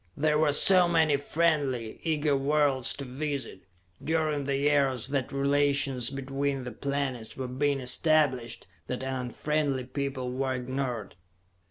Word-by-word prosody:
There 150 Hz, +1 st, +2 dB
were 155 Hz, -1 st, +3 dB
so 180 Hz, +4 st, +6 dB
many 160 Hz, -3 st, +3 dB
friendly, 140 Hz, -6 st, -1 dB
eager 150 Hz, -3 st, +1 dB
worlds 140 Hz, -2 st, +1 dB
to 140 Hz, -, -6 dB
visit, 140 Hz, -4 st, -5 dB, 0.4 s
during 155 Hz, -3 st, 0 dB
the 140 Hz, 0 st, 0 dB
years 140 Hz, -4 st, +2 dB
that 140 Hz, -1 st, -2 dB
relations 140 Hz, -2 st, +1 dB
between 135 Hz, 0 st, -3 dB
the 125 Hz, -, -6 dB
planets 135 Hz, -2 st, -4 dB
were 130 Hz, -1 st, -4 dB
being 140 Hz, +2 st, 0 dB
established, 130 Hz, -2 st, +1 dB, 0.2 s
that 125 Hz, +1 st, -4 dB
an 130 Hz, 0 st, -3 dB
unfriendly 145 Hz, +1 st, -1 dB
people 130 Hz, -1 st, -4 dB
were 130 Hz, 0 st, -1 dB
ignored. 125 Hz, -6 st, -4 dB
140 Hz, 135 wpm, -28 LUFS, 130-150 Hz, 0.4 s, so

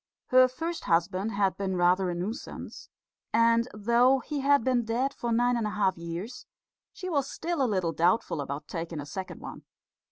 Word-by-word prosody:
Her 255 Hz, 0 st, +7 dB
first 325 Hz, +6 st, -5 dB
husband 185 Hz, +5 st, +1 dB
had 200 Hz, -1 st, +1 dB
been 190 Hz, -2 st, -2 dB
rather 180 Hz, +1 st, +3 dB
a 175 Hz, -, -2 dB
nuisance; 200 Hz, +9 st, -6 dB, 0.4 s
and 230 Hz, +1 st, +3 dB
though 235 Hz, +5 st, +3 dB
he 290 Hz, +3 st, -4 dB
had 280 Hz, -2 st, +3 dB
been 250 Hz, -1 st, +2 dB
dead 245 Hz, +5 st, -1 dB
for 235 Hz, -, -3 dB
nine 245 Hz, +2 st, +3 dB
and 230 Hz, -2 st, 0 dB
a 210 Hz, -, -5 dB
half 190 Hz, -3 st, +2 dB
years, 170 Hz, +8 st, -7 dB, 0.4 s
she 370 Hz, -, -7 dB
was 285 Hz, -6 st, 0 dB
still 340 Hz, -3 st, -3 dB
a 255 Hz, -, +2 dB
little 185 Hz, -5 st, 0 dB
doubtful 175 Hz, -2 st, +1 dB
about 140 Hz, +1 st, -5 dB
taking 165 Hz, -2 st, -5 dB
a 145 Hz, -, -5 dB
second 185 Hz, +6 st, -7 dB
one. -, -, -8 dB
220 Hz, 185 wpm, -28 LUFS, 180-255 Hz, 0.4 s, Her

